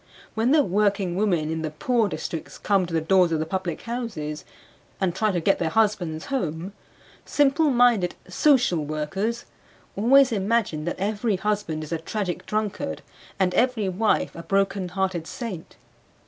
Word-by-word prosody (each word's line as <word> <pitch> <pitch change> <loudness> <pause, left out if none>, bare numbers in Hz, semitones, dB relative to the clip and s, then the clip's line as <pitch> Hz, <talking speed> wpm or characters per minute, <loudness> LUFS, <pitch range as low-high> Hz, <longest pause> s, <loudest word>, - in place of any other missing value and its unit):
When 225 +2 +1
the 295 +1 +5
working 200 -3 +1
women 175 -6 +1
in 160 0 -2
the 155 - -2
poor 225 +8 0
districts 165 -3 -5
come 195 -3 +1
to 170 - -8
the - - +3
doors 180 +1 +3
of 160 - +2
the 155 - -1
public 180 -1 -3
houses 220 -11 -4 0.6
and 185 -3 +1
try 215 +3 +1
to 180 - 0
get 195 +4 +2
their 165 - 0
husbands 180 -5 0
home, 180 - -3 0.5
simple 290 +2 +2
minded 240 -8 +3
"social 215 - +3
workers" 190 +10 -3 0.5
always 265 +5 +5
imagine 200 -7 0
that 175 - -3
every 210 +2 0
husband 190 -5 -2
is 155 - -9
a 165 - -1
tragic 180 +1 -4
drunkard 210 - -2 0.4
and 185 -2 +2
every 245 -6 +1
wife 210 +4 0
a 170 - -6
broken 195 0 0
hearted 185 -3 -2
saint. 215 -9 -7
195 Hz, 160 wpm, -24 LUFS, 165-225 Hz, 0.6 s, the